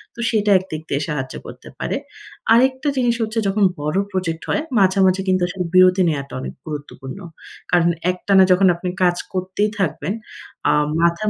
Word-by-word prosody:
তো - - -14
সেটা 215 -2 +1
একদিক 160 -4 -7
দিয়ে 140 +1 -1
সাহায্য 135 -5 -4
করতে - - -11
পারে। - - -2 0.6
আরেকটা 260 +4 +3
জিনিস 245 -2 +2
হচ্ছে, 225 0 -1
যখন 200 +1 +1 0.2
বড় 150 +4 -1
প্রজেক্ট 170 -4 -3
হয় - - +1 0.2
মাঝে, 190 0 +3
মাঝে 185 +1 +1
কিন্তু 185 -1 +2
আসলে 180 0 -4
বিরতি 185 0 +6
নেয়াটা 140 -3 -4
অনেক - - -6
গুরুত্বপূর্ণ। 145 -1 -7 0.5
কারণ 175 -1 +4 0.2
একটানা 190 +1 +3
যখন 185 +1 +5
আপনি 180 +1 -4
কাজ 175 -1 +3 0.2
করতেই 185 +3 -1
থাকবেন, 170 -1 -1 0.6
আ - - +5 0.3
মাথার 170 +5 +2
185 Hz, 165 wpm, -20 LUFS, 165-200 Hz, 0.6 s, বিরতি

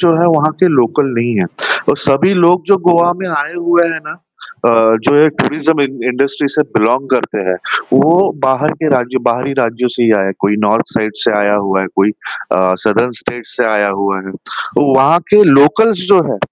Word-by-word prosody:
जो 175 -2 +3
है 175 - +3
वहाँ 155 +1 +1
के 185 - +5
लोकल 140 -1 +1
नहीं 120 0 -1
है 95 - +1 0.4
और - - +2
सभी 175 +8 +1
लोग 175 0 +3
जो 200 0 +4
गोवा 175 0 +3
में 190 -1 -5
आए 150 +1 -3
हुए 175 0 +1
हैं 160 - -5
ना 150 - -8 0.5
अ, 120 - +4 0.3
जो 145 - +3
ये 155 - +5
टूरिज़्म 155 0 0
इं 135 -3 -3
इंडस्ट्री 140 +3 -1
से 150 +2 0
बिलॉन्ग 125 +5 0
करते 125 -4 -1
हैं, 90 - 0 0.4
वो 175 +6 +3
बाहर 130 +3 +1
के 155 - +1
राज्यों 125 0 -2
बाहरी 125 +3 -1
राज्यों 120 +1 -1
से 120 - -1
ही 115 - +3
आए 95 - 0
हैं, 95 - -2
कोई 105 +1 0
नॉर्थ 110 +3 +1
साइड 110 -1 -2
से - - +2
आया 105 0 +1
हुआ 95 0 0
है, 95 - -3
कोई 100 +2 +2
अ, 95 -3 -3
सादर्न 115 +3 +1
स्टेट 120 -1 -7
से 125 - -3
आया 105 -1 +1
हुआ 100 -1 -2
है। 95 - -8 0.5
वहाँ 140 +4 +3
के 210 0 +6
लोकल्स 180 +8 +3
जो 185 -3 +5
हैं, - - -3
135 Hz, 205 wpm, -13 LUFS, 115-165 Hz, 0.5 s, के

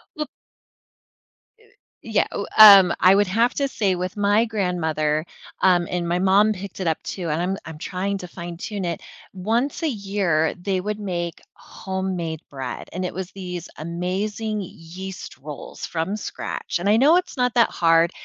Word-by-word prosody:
Well 300 -1 -3 1.8
Yeah, 215 -2 +1
w 200 - -3
um, 200 -4 +10
I 185 +1 +6
would 205 0 +3
have 230 +6 +2
to 280 -1 +1
say 200 -7 0
with 180 +3 -4
my 205 +2 +3
grandmother, 160 -8 -1 0.4
um, 175 -2 +4
and 175 -1 -2
my 175 +1 0
mom 195 +3 +4
picked 195 -1 -6
it 175 - -1
up 160 - 0
too, 175 -4 -4
and 155 +3 0
I'm 190 +2 -1
I'm 160 -1 -9
trying 190 +5 -3
to 180 - -8
fine-tune 175 +4 -6
it, 170 -2 -3 0.3
once 230 - -1
a 320 - +2
year, 195 - 0
they 190 -1 -1
would 210 +1 -3
make 175 -4 -4
homemade 185 -4 -4
bread, 135 -3 -6
and 185 +2 -3
it - - -4
was 185 0 -5
these 180 -3 -6
amazing 195 +6 -3
yeast 185 +2 -9
rolls 145 +1 -8
from 175 +6 -2
scratch - - -4
and 195 - 0
I 215 - +5
know 285 +7 +6
it's 360 -5 -1
not 250 -1 +1
that 235 - +5
hard, 165 0 +3
190 Hz, 170 wpm, -23 LUFS, 170-205 Hz, 1.8 s, um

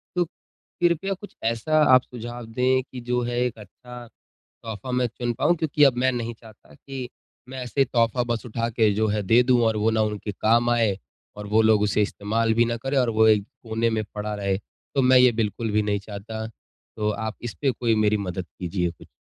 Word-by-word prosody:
तो 175 -1 +2
कृपया 175 +2 -3
आप 190 - -2
कुछ 205 - -11
ऐसा 115 +8 +1
आप 130 - +7
सुझाव 120 0 -8
दें 130 +3 +1
कि 125 -2 -10
जो 125 0 -1
है 120 0 -2
एक 120 - -3
अच्छा 120 +4 -11 0.4
तोहफ़ा 110 +2 -9
में 125 0 +2
चुन 120 +1 -3
पाऊँ 175 - +3
क्योंकि 150 -2 +3
अब 130 -3 +4
में 130 +1 +3
नहीं 120 -1 -3
चाहता 110 -2 -17
कि 135 -3 -7 0.4
में 130 - -8
ऐसे 130 +2 +1
तोहफ़ा 120 -1 +1
बस 120 +1 -2
उठा 115 0 -2
के 110 -2 +3
जो 110 +1 +1
है 105 0 0
दे 115 +5 +5
दूँ, 125 -1 +3
और 110 -1 +1
वो 110 +2 +2
ना 110 0 +1
उनके 105 -1 -3
काम 120 +3 +2
आए, 115 -5 +2 0.4
और 105 0 -7
वो 110 +2 +3
लोग 110 -1 +4
उसे 105 0 +2
इसतमाल 110 +2 0
भी 120 +1 +4
न 120 0 -1
करें 135 +1 -2
और 125 -2 +2
वो 110 0 +4
एक 105 -2 +4 0.2
कोने 115 0 0
में 110 -1 0
पड़ा 105 0 -3
रहे। 100 -2 -1 0.4
तो 135 - +3
मैं 130 0 +5
ये 125 -1 +6
बिल्कुल 110 0 -2
भी 105 0 +2
नहीं 105 -1 0
चाहता। 110 +2 -7
तो 105 -1 -7
आप 110 +1 -4
इस 120 - -5
पे 135 - +3
कोई 120 -2 0
मेरी 110 0 +2
मदद 95 -3 -4
कीजिए 90 -1 -1
कुछ। 85 - -15
115 Hz, 220 wpm, -24 LUFS, 105-125 Hz, 0.4 s, आप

